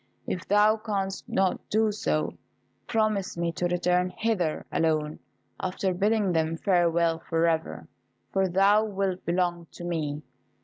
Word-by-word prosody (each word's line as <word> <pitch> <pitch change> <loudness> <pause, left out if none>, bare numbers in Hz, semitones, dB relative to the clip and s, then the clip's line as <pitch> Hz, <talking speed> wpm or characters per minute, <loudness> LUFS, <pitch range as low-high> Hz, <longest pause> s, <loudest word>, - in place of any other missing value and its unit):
If 180 - -4
thou 210 +2 +4
canst 200 -3 -3
not 190 -1 0
do 220 0 +2
so, 75 - -1 0.5
promise 215 -5 0
me 170 0 0
to 175 +1 -1
return 180 +1 +1
hither 195 -9 0
alone, 155 -2 0 0.4
after 185 0 -1
bidding 205 +1 +1
them 160 -1 0
farewell 170 -2 +2
for 165 0 0
ever, 160 -1 -1 0.5
for 195 -1 +2
thou 195 +4 +4
wilt 195 -3 -2
belong 175 -1 0
to - - -9
me. 155 -4 -3
180 Hz, 135 wpm, -27 LUFS, 165-200 Hz, 0.5 s, thou